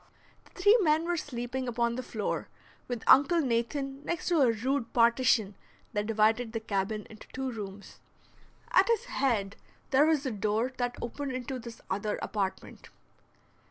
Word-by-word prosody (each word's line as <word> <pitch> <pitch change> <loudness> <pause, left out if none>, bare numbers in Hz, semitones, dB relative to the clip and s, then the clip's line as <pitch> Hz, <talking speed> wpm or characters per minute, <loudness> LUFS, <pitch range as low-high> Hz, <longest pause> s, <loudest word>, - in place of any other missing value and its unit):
The - - -18
three 410 +5 +6
men 315 -2 +3
were 350 0 0
sleeping 255 -3 -4
upon 235 0 0
the 255 - -3
floor, 220 -4 -3 0.4
with 245 -2 -4
Uncle 310 +6 +6
Nathan 270 +1 -1
next 345 +1 -2
to 335 -4 +3
a 250 -4 +5
rude 245 +3 -1
partition 230 -3 +3 0.4
that 210 0 -1
divided 225 +1 +2
the 225 - -1
cabin 210 0 -2
into 215 -1 -13
two 265 0 -4
rooms. 200 -3 -8 0.7
At - - +5
his 465 -3 +1
head 220 -7 -1 0.3
there 285 +3 +5
was 305 -3 +2
a 260 - -1
door 215 +4 -1
that 245 -1 -1
opened 265 +3 -4
into 255 +1 -4
this 235 -1 -10
other 205 +1 -2
apartment. 195 -3 -4
245 Hz, 160 wpm, -29 LUFS, 220-275 Hz, 0.7 s, three